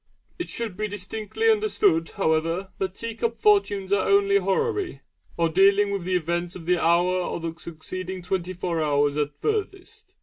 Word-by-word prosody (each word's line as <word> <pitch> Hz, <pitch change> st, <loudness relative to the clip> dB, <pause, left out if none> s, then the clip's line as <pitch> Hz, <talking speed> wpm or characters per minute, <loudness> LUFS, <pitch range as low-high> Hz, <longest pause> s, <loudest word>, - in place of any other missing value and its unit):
It 355 Hz, -, -4 dB
should 230 Hz, -5 st, -4 dB
be 215 Hz, +2 st, -2 dB
distinctly 210 Hz, -, -3 dB
understood, 205 Hz, -, +2 dB
however, 165 Hz, +1 st, 0 dB
that 190 Hz, -1 st, -2 dB
tea 230 Hz, 0 st, -5 dB
cup 230 Hz, 0 st, -2 dB
fortunes 200 Hz, -2 st, +2 dB
are 200 Hz, -, +1 dB
only 400 Hz, 0 st, +4 dB
horary, 415 Hz, -5 st, -1 dB, 0.4 s
or 170 Hz, -, +3 dB
dealing 200 Hz, +4 st, +4 dB
with 195 Hz, -3 st, -3 dB
the 185 Hz, 0 st, 0 dB
events 175 Hz, 0 st, -1 dB
of 170 Hz, -, -9 dB
the 180 Hz, 0 st, +2 dB
hour 175 Hz, +2 st, +3 dB
or 180 Hz, -, -3 dB
the 165 Hz, -1 st, -4 dB
succeeding 185 Hz, +3 st, -6 dB
twenty 185 Hz, 0 st, -2 dB
four 170 Hz, -2 st, -2 dB
hours 145 Hz, -1 st, +2 dB
at 145 Hz, -1 st, -2 dB
furthest. 430 Hz, 0 st, -4 dB
190 Hz, 170 wpm, -25 LUFS, 170-225 Hz, 0.4 s, only